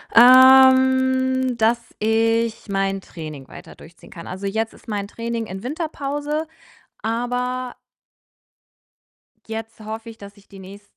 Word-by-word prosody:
Ähm, 260 +1 +6
dass 230 +1 +2 0.2
ich 225 +1 0
mein 195 0 -1
Training 155 -7 -10
weiter - - -13
durchziehen 165 +1 -17
kann. 170 - -10
Also, 190 +2 -7
jetzt 220 +3 -2
ist - - -20
mein 205 -2 -3
Training 230 +1 -4
in 190 +3 -8
Winterpause, 295 +1 -4 0.5
aber 245 +2 -3 1.7
jetzt 225 0 -7
hoffe 220 +2 -7
ich, 225 - -12
dass 200 0 -13
ich 200 - -21
die 195 - -14
nächsten 195 +2 -12
230 Hz, 125 wpm, -21 LUFS, 200-260 Hz, 1.7 s, Ähm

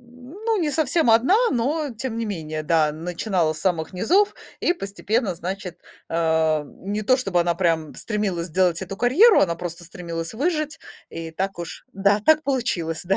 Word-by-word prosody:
Ну, 255 - -5
не 320 -5 0
совсем 310 -2 +2
одна, 235 - +5
но 285 +5 0
тем 235 0 -5
не 230 - -2
менее. 155 -7 -4
Да, 155 -1 +2
начинала 170 +1 -1
с 155 - -9
самых 170 -4 -1
низов 375 - +2 0.3
и - - +3
постепенно, 205 - -2
значит, 180 +1 -6 0.3
э, 160 -2 +1
не 200 +8 -5
то 255 +5 +4
чтобы 195 -8 +1
она 170 0 +1
прям 165 -3 0
стремилась 200 -6 -2
сделать 180 0 +1
эту 190 +1 -6
карьеру, 290 - +5
она 170 -3 +2
просто 175 0 -6
стремилась 165 -1 -6
выжить. 310 +3 -1 0.3
И 165 0 -6
так 190 +3 -3
уж 165 -3 -7
да, 200 +2 +2
так 315 0 +5
получилось, 190 - -1
да. 195 +2 +1
195 Hz, 170 wpm, -23 LUFS, 170-250 Hz, 0.3 s, одна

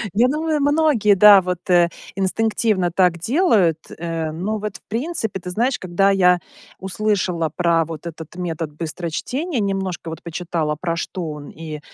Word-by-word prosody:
Я 235 +4 +5
думаю, 305 +2 0
многие, 285 -8 +3
да, 200 0 +8
вот, 180 -1 -4
э, 175 -1 +5 0.3
инстинктивно 200 -1 +1
так 180 -1 +2
делают, 205 - +2 0.2
э, 165 -1 -3
но 195 +7 -3
вот, 210 -1 -5
в - - -30
принципе, 225 - -3
ты 180 - -7
знаешь, 240 +8 0
когда 190 +2 +2
я 180 -2 +4 0.4
услышала 190 -4 -1
про 170 +1 +2
вот 160 +1 -8
этот 165 -1 -8
метод 165 -3 -4
быстрочтения, 175 - -3
немножко 195 -4 -2
вот 160 - -7
почитала, 165 -2 -3
про 170 -1 -1
что 170 0 -4
он, 150 -1 -9
и, 155 -1 -8
180 Hz, 155 wpm, -21 LUFS, 165-215 Hz, 0.4 s, да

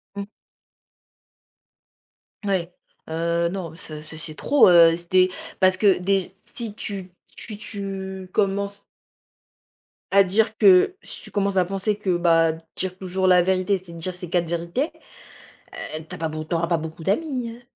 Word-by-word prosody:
Mmh. 200 0 -4 2.2
Oui. 190 -4 0 0.4
Heu 170 +1 0
non, 175 -4 -5
ce 155 -2 -9
ce 155 +1 -11
c'est 155 -1 -7
trop, 285 - +5
heu. 170 -2 +7
Si 170 0 -15
tu 185 - +1
es, 185 - +1 0.3
parce 185 0 +4
déj 195 -2 +2 0.2
si 230 -4 -5
tu 195 -3 -6 0.3
tu 215 -3 -7
tu 190 -2 -6
commences 200 0 0 1.3
à 200 0 +7
dire 220 +4 +1
que 195 - +6
si - - -8
tu - - -10
commences 200 -1 0
à 185 - +4
penser 195 +3 -1
que, 195 -4 0
bah, 165 -1 +4 0.2
dire 185 -1 -3
toujours 190 0 -2
la 180 -1 +6
vérité, 185 +1 +1
c'est 170 -2 -12
de - - -9
dire 180 +3 -4
ces 180 -1 -8
4 175 -1 +1
vérités, 170 - -2 1.1
heu, 155 - -7
tu - - -7
as - - -8
pas 160 - -1
beauco 155 0 -5
tu - - -1
auras 170 +1 +1
beaucoup 160 +1 -7
d'amis, 250 - -1
hein. 235 +2 -12
185 Hz, 165 wpm, -23 LUFS, 170-200 Hz, 2.2 s, heu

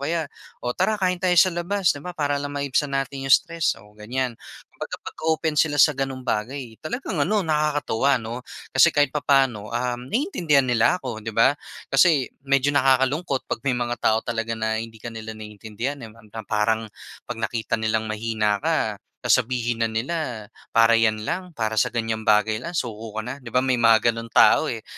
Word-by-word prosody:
kaya, 160 +3 -1 0.4
"O, 125 - 0
tara 215 +9 +1
kain 180 -2 0
tayo 180 -1 +2
sa 185 +2 +6
labas." 175 +2 +1
'Di 145 - -9
ba, 180 +3 -8
para 145 -2 0
lang 145 0 -5
maibsan 140 +1 0
natin 135 0 -3
'yong 135 - +9
stress, 170 -2 -2
o 105 +1 -17
ganyan. 120 +4 -3 0.4
Kumbaga, - - -6
pag-open 160 0 -1
sila 150 0 +2
sa 145 +2 +6
gano'ng 135 -2 -4
bagay 115 +1 -3
talagang 165 - -4
ano, 200 +6 +1
nakakatuwa 145 -4 +1
'no? 115 +1 -5 0.3
Kasi - - +6
kahit 145 -2 +3
papaano, 135 -7 +1
um, 120 +1 -2
naiintindihan 175 - +2
nila 120 +5 +3
ako, 120 -9 -6
'di 110 0 -7
ba? 125 +4 +5 0.4
Kasi, 155 -8 +4 0.2
medyo 140 +1 +3
nakakalungkot 135 +2 +2
'pag - - -4
may 130 -1 0
mga 120 -1 -3
tao 110 0 +2
talaga 115 0 -2
na 110 0 -1
hindi 115 0 -8
ka 115 +1 -8
nila 110 -1 -7
naiintindihan, 110 +6 -6
eh, 115 - -8
ram 110 -1 -18
na 115 - -5
parang 110 +1 0 0.4
'pag 120 - -4
nakita 115 0 -2
nilang 110 0 0
mahina 110 -1 -1
ka, - - 0 0.3
sasabihin 120 -1 +1
na 115 - +2
nila 115 -1 -3 0.2
"Para 115 0 +4
'yan 110 -1 +2
lang, 180 +5 -3
para 110 -1 -1
sa - - +2
ganyang 115 -1 -3
bagay 110 +1 +3
lang 170 +5 -6
suko 110 -4 -4
ka 110 - -1
na?" 125 +2 -4
'Di 125 - -10
ba, 125 - +2
may 130 -1 +2
mga 115 0 +5
gano'ng 115 0 -7
tao - - +5
eh. - - -6
125 Hz, 190 wpm, -23 LUFS, 110-145 Hz, 0.4 s, yong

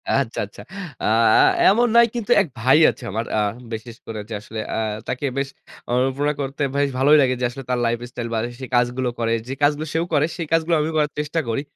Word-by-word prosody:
আচ্ছা, 135 -4 -1
আচ্ছা। 100 - -13 0.4
আ - - 0
আ 110 0 +5 0.3
এমন 240 +4 +4
নাই, 235 0 +8
কিন্তু 235 0 -3
এক - - -2
ভাই 130 +5 +5
আছে 125 - -7
আমার। 115 +3 -2
আ - - +3 0.3
বিশেষ 115 +1 -7
করে 110 -1 -6
যে - - -5
আসলে 110 +1 -7 0.2
আ - - -1 0.3
তাকে 125 +3 -3
বেশ 135 0 -1 0.4
অনুপ্রেরনা 135 +4 +1
করতে 135 +2 -5
বেশ 140 0 +2
ভালোই 145 +3 +5
লাগে। 130 -1 +2
যে - - +2
আসলে 135 +2 -8
তার 125 -1 +1
লাইফ 115 0 +1
স্টাইল 120 -1 -5
বা, - - 0
যে - - -5
সে - - -4
কাজগুলো 125 +1 +1
করে 115 0 +1
যে 135 - -3
কাজগুলো 150 +2 +2
সেও 165 +1 0
করে 145 0 +4
সেই 165 -3 -4
কাজগুলো 165 +1 +2
আমিও 160 +1 -2
করার 150 -1 +1
চেষ্টা 150 +2 -1
করি। 115 +5 -1
135 Hz, 225 wpm, -22 LUFS, 120-150 Hz, 0.4 s, নাই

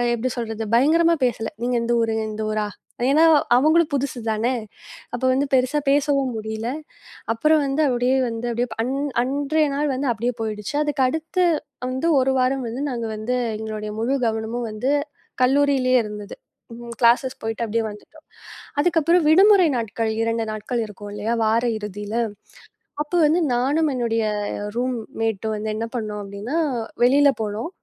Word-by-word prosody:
எப்படி 245 +3 -2
சொல்றது? 225 -1 -3
பயங்கரமா 330 +6 +4
பேசல. 225 -3 -1
நீங்க 245 +1 0
எந்த 240 +1 0
ஊர்? 225 -1 0 0.2
இந்த 215 - -5
ஊரா? 215 -1 0 0.4
ஏன்னா 305 +3 +5 0.3
அவங்களுக்கு 310 +3 +3
புதுசுதானே. 240 -3 -1 0.6
அப்ப 245 - -4
வந்து 275 +2 +1
பெருசா 255 +3 +3
பேசவும் 275 -3 +2
முடியல. 220 +1 -4 0.7
அப்புறம் 305 +6 +3
வந்து, 275 +3 0
அப்படியே 250 +1 +1
வந்து 230 +1 -5
அப்படியே 240 +2 -1 0.2
அன் 255 +3 -2 0.3
அன்றைய 290 +4 +1
நாள் 295 +1 0
வந்து 270 +2 -2
அப்படியே 235 +2 -1
போயிடுச்சு. 215 +3 -4
அதுக்கு 295 -2 -1
அடுத்து 320 +6 0 0.4
வந்து 260 +6 -1
1 265 0 +2
வாரம் 255 0 +1
வந்து 240 +5 -4
நாங்க 235 -2 -3
வந்து 215 +4 -2 0.2
எங்களுடைய 215 -1 -5
முழு 260 +5 +1
கவனமும் 225 +2 -2
வந்து 230 +6 -1 0.5
கல்லூரியிலயே 265 -1 +3
இருந்தது. 210 -1 -7 0.4
ம் 235 0 -8
கிளாசஸ் 250 +2 +3
போயிட்டு 225 +1 -2
அப்படியே 225 +1 -1
வந்துட்டோம். 310 +10 -15 0.6
அதுக்கப்புறம் 335 0 +3
விடுமுறை 385 +2 +6
நாட்கள் 225 0 -2
2 230 0 -1
நாட்கள் 230 +2 -2
இருக்கும் 205 0 -10
இல்லையா? 210 +3 -1
வார 225 +2 +2 0.2
இறுதியில. 210 +1 -6 0.9
அப்ப 300 - -24
வந்து 315 +4 +3 0.2
நானும் 290 +6 +1
என்னுடைய 230 -2 0 0.5
ரூம் 250 0 0 0.3
மெட்டும் 220 -1 -1
வந்து 215 +1 -4
என்ன 225 +1 -2
பண்ணோம்? 210 -2 -4
அப்படின்னா, 200 +9 -5 0.5
வெளியில 280 +3 +5
போனோம். 215 +6 -3
245 Hz, 145 wpm, -22 LUFS, 220-280 Hz, 0.9 s, விடுமுறை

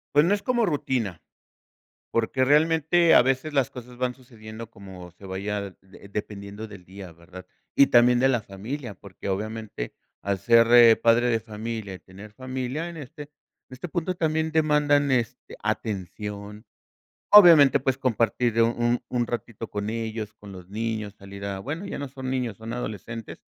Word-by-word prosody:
Pues, 145 - +7
no 200 +4 +3
es 200 - -8
como 240 -3 +1
rutina, 130 - -2 0.9
porque 115 +3 +1
realmente, 160 +3 +4
a - - +8
veces 135 +4 -1
las 135 -4 +2
cosas 125 0 -11
van 125 0 -1
sucediendo 115 -3 -11
como 95 -3 -11
se 95 - -18
vaya 100 +1 -4
de 95 +1 -16
dependiendo 105 +1 -6
del 100 -3 -12
día, 95 -2 -11
¿verdad? 85 +2 -13 0.3
Y 140 - +6
también 120 0 +5
de 135 - +4
la 120 -4 +1
familia, 110 +6 -6
porque, 100 +1 -10
obviamente 110 - -5 0.3
al 100 -1 -1
ser, 115 +3 +5
eh, 115 -2 +8
padre 115 +2 +3
de 115 -2 +1
familia, 110 -2 -6
y - - -9
tener 100 +3 -13
familia 130 +5 -4
en 165 - -10
este, 150 +2 -9
en 145 - -13 0.4
este 130 +7 -7
punto 180 +2 -2
también 160 -1 -1
demandan 150 -2 +3
este, 125 -1 -2
atención. 105 0 -5 0.7
Obviamente, 160 -9 +8
pues, 130 -1 0
compartir 115 -2 +1
un 120 +1 +1
un 120 -2 -1
ratito 115 -1 -5
con 105 +1 -3
ellos, 110 -1 -4
con 100 -2 -12
los 90 -1 -12
niños, 110 -1 -4
salir 100 0 -11
a, 100 -1 -4
bueno, 160 - -5
ya - - -5
no 140 - -4
son 130 0 -7
niños, 125 -5 -2
son 110 +2 -8
adolescentes. 115 -1 -6
115 Hz, 170 wpm, -25 LUFS, 105-135 Hz, 0.9 s, a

